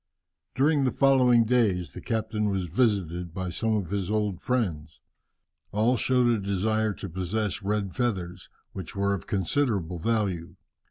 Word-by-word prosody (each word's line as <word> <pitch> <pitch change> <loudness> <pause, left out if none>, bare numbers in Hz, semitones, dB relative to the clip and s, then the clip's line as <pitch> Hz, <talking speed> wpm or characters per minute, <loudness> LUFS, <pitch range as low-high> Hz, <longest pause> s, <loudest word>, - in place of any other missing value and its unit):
"During 145 +1 +3
the 130 - +3
following 125 -3 +4
days 100 - +1
the - - -8
captain 110 -2 -1
was 95 -2 -1
visited 90 -4 0
by 95 -1 -3
some 110 +5 0
of 95 -4 -3
his 100 -2 -2
old 105 -4 -1
friends. 85 - -2 0.7
All 110 +5 +2
showed 125 +2 +2
a 120 -2 +3
desire 105 +2 0
to - - -6
possess 95 +4 -2
red 100 -1 -1
feathers, 95 -8 -2 0.2
which 95 -4 -7
were 100 0 +1
of 95 - -5
considerable 100 - 0
value. 95 -4 -1
100 Hz, 150 wpm, -27 LUFS, 90-115 Hz, 0.7 s, following